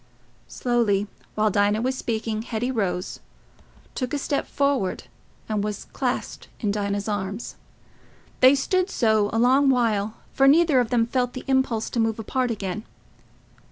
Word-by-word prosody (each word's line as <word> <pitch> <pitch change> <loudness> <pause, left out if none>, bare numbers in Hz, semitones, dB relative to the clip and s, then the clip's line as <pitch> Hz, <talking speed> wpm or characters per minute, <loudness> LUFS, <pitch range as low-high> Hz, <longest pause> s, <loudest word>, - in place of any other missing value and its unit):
Slowly, 230 -5 +1 0.3
while 215 0 +2
Dinah 205 +3 +2
was 260 +1 0
speaking, 220 -3 -2
Hetty 235 +2 -2
rose, 185 -6 -2 0.7
took 255 +2 -3
a - - 0
step 280 0 -2
forward, 280 -9 0 0.4
and 215 -2 -1
was 210 -1 -4
clasped - - -3
in 210 - 0
Dinah's 200 0 -2
arms. 205 +1 -4 0.8
They 260 +2 +7
stood 370 +7 0
so 220 -3 +2
a 225 - -1
long 260 +4 +4
while, 220 -4 +1 0.2
for 270 - +4
neither 310 -1 +5
of 240 -3 0
them 235 -2 +2
felt 245 +1 -1
the 255 - -7
impulse 265 -4 +1
to 235 - -2
move 225 -1 +1
apart 250 +3 -1
again. 210 -2 -3
230 Hz, 150 wpm, -24 LUFS, 210-260 Hz, 0.8 s, They